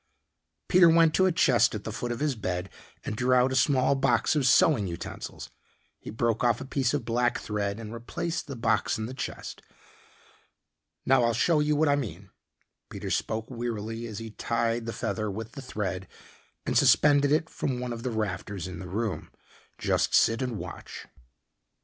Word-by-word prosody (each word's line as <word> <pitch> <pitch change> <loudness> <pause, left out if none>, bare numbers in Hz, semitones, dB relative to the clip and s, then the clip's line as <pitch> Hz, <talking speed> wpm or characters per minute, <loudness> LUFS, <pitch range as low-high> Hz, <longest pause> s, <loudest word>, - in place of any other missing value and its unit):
Peter 180 -2 +6
went 165 -1 +5
to 190 - +4
a - - +2
chest 130 -9 +3
at 105 - -5
the 110 - -5
foot 120 +2 -4
of 120 - -4
his 150 -2 +1
bed 90 -4 -4 0.3
and - - -3
drew 125 +3 +2
out 125 +1 +4
a - - -1
small 130 0 +3
box 135 -1 +2
of 140 -3 +2
sewing 130 - +4
utensils. 85 -1 -7 0.5
He - - -9
broke 115 +1 0
off 120 -2 +3
a - - -6
piece 135 0 0
of 140 -6 -3
black 120 +1 +1
thread 105 -1 -3
and 110 -1 -7
replaced 160 +8 -4
the 140 - -6
box 115 - +1
in 110 - -3
the 125 - -6
chest. 130 - -6 1.4
"Now 130 -2 +4
I'll 115 -1 +2
show 155 +7 +3
you 150 0 +2
what 155 +2 +3
I 145 - +4
mean," 95 - -5 0.6
Peter - - -6
spoke 110 +3 -2
wearily 115 -1 -4
as 110 -3 -7
he 115 0 -6
tied 115 +1 -1
the - - -2
feather 110 -2 -3
with 110 +3 -6
the 140 - -8
thread 95 -6 -4 0.6
and - - -1
suspended 145 -1 +5
it 155 +1 +2
from 130 -5 -3
one 125 -1 -3
of 115 - -7
the 125 - -2
rafters 100 -4 -3
in 90 -2 -7
the 90 0 -8
room. 105 +2 -3 0.5
"Just - - +1
sit 115 +3 +4
and 125 -4 -2
watch." - - -8
120 Hz, 185 wpm, -27 LUFS, 110-135 Hz, 1.4 s, Peter